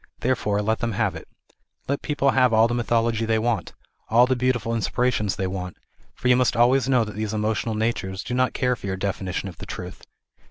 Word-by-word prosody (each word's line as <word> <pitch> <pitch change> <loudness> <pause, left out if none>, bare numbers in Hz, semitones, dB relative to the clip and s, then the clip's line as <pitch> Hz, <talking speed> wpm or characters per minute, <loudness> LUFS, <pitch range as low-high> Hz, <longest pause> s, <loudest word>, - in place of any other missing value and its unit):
Therefore 105 -5 0
let 110 +1 0
them 115 -1 -2
have - - 0
it. - - -9 0.6
Let 140 +1 -1
people 140 -2 +1
have 130 -2 +3
all 110 +1 +5
the 120 - -2
mythology 115 -1 +1
they 110 0 +1
want, 115 +1 -1 0.4
all 120 +2 +6
the 130 0 +1
beautiful 125 -2 0
inspi 115 -3 -3
rations 105 -4 -1
they 95 - -2
want, 90 -1 -5 0.4
for - - -3
you 125 - +6
must 125 -2 +2
always 125 +2 +4
know 125 -3 +4
that 105 -1 -6
these 110 0 -3
emotional 110 +1 -1
natures 105 -4 -2
do 120 - -5
not 130 +1 +1
care 125 -1 +1
for 105 - -8
your 95 -1 -2
definition 95 -1 -3
of 90 - -9
the - - -8
truth. - - -7
115 Hz, 215 wpm, -24 LUFS, 105-125 Hz, 0.6 s, all